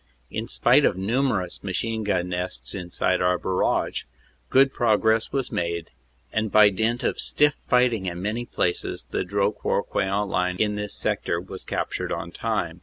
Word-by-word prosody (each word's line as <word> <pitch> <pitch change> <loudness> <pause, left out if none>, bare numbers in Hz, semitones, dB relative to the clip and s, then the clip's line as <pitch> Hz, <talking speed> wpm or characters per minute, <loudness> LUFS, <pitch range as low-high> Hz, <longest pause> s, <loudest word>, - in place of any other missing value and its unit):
In - - -3
spite - - +4
of - - +2
numerous 105 -3 -1
machine 110 +3 -2
gun 90 -3 0
nests 90 0 -3
inside 90 0 -1
our 90 0 +3
barrage, 95 +1 0 0.4
good 135 0 +4
progress 110 -1 +2
was 135 -2 -2
made, 85 -1 -2 0.4
and 110 -1 0
by 105 -1 +7
dint 110 +5 0
of - - -1
stiff 150 0 +4
fighting 125 -6 +3
in 85 -1 -4
many 110 +5 -3
places 90 - -2
the - - 0
Dro - - +1
court - - -2
Queant 100 +2 0
line 90 -1 0
in 105 0 +1
this 105 0 -2
sector 85 - -1
was 95 +1 -8
captured - - -3
on 85 0 -4
time. 90 -7 -2
100 Hz, 165 wpm, -24 LUFS, 90-115 Hz, 0.4 s, by